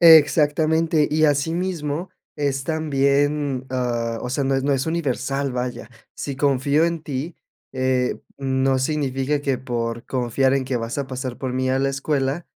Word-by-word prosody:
Exactamente, 160 0 +5
y 155 +1 +3
asimismo 160 +2 0 0.3
es 140 -2 -1
también, 145 -3 +1
ah, 120 -3 -1
o 125 - -4
sea, 135 +2 -1
no 135 0 +1
es 135 - +1
no 140 - +2
es 135 - 0
universal, 140 -4 -1
vaya. 125 -2 -4 0.3
Si 140 -2 -5
confío 140 +2 +2
en 170 -2 -1
ti, 145 +4 -4 0.4
eh, 130 -1 +1 0.2
mm, 130 -1 -1
no 135 -1 +3
significa 140 0 0
que, 135 -2 0
por 120 -2 -3
confiar 130 +1 +1
en 135 -1 +1
que 130 -1 -1
vas 115 +3 -3
a 140 - -2
pasar 130 -1 -5
por 130 -2 -3
mí 130 0 0
a 130 - +2
la 135 - +2
escuela, 135 +3 -1
135 Hz, 165 wpm, -22 LUFS, 130-150 Hz, 0.4 s, Exactamente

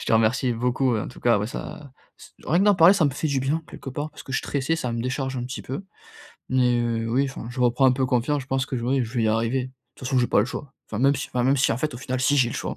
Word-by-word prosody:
Je - - -6
te - - -1
remercie 115 +3 +3
beaucoup, 125 +1 +1
en 105 - -3
tout - - -13
cas, 120 -3 +3
ouais 105 - -2
ça 140 +4 -8 0.3
c - - -15
rien 165 - +2
que 195 - +3
d'en 205 -1 +5
parler 175 +1 +7
ça 195 -5 +2
me 145 - +3
fait 150 +3 -2
du 140 -2 0
bien 150 +5 -1
quelque - - -9
part 145 +4 -4
parce - - -12
que 135 - -9
je - - +2
suis - - -7
stressé, 145 +3 0
ça 125 -7 -3
me 115 - -2
décharge 130 +2 -2
un 120 - -3
petit 130 +4 -6
peu. 140 +9 -6 0.6
Mais, 125 -2 +2
heu, 115 -1 -1
oui 130 +4 +2
enfin 130 -3 -8
je 125 +1 -5
reprends 125 +2 +3
un 130 - +5
peu 130 +1 0
confiance, 130 +3 0
je - - -15
pense 135 0 0
que 130 - -3
j 120 - -4
oui, 130 +1 +1
je 115 - -9
vais 115 - +2
y - - +3
arriver. 115 +4 0
De - - -13 0.3
toute 130 - -6
façon 130 - +2
j'ai 120 - +3
pas - - +3
le - - +1
choix 135 +1 -7
enfin 110 - -5
même 140 +2 +4
si - - -4
enfin 125 - -1
même 135 +2 +3
si 135 - +2
en - - -1
fait 150 +1 -2
au 120 - -7
final 130 0 -3
si 145 +3 +3
j'ai 125 -3 +4
le - - -6
choix, - - -3
130 Hz, 335 wpm, -24 LUFS, 120-140 Hz, 0.6 s, parler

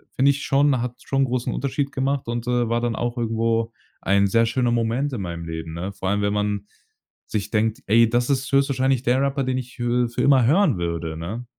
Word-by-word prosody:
finde 135 +2 +4
ich 140 0 -4
schon, 140 -1 +2
hat 125 0 -5
schon 135 0 +1
großen 125 -1 -2
Unterschied 140 0 -2
gemacht 135 -1 -1
und, 120 0 -3
äh, 120 -2 +1
war 115 +1 0
dann 120 -1 -1
auch 120 +1 -3
irgendwo 115 0 0 0.3
ein 100 +1 +3
sehr 115 +4 +3
schöner 120 +1 0
Moment 120 +5 0
in 115 - -3
meinem 85 -2 -5
Leben, 80 0 -6
ne? 90 +4 -4
Vor 95 -1 -3
allem, 100 +1 +1
wenn 100 0 0
man 105 -1 -1 0.6
sich 100 -2 -3
denkt: 110 0 0
„Ey, 115 +3 +5
das 120 +2 0
ist 135 -1 0
höchstwahrscheinlich 135 -2 +2
der 125 +1 +2
Rapper, 140 0 0
den 130 0 -1
ich 125 -1 -7
hö 120 0 +1
für 115 - -13
für - - 0
immer 135 -4 +5
hören 155 - +3
würde,“ 85 -2 -3
ne? 105 +9 -5
120 Hz, 225 wpm, -23 LUFS, 105-130 Hz, 0.6 s, Ey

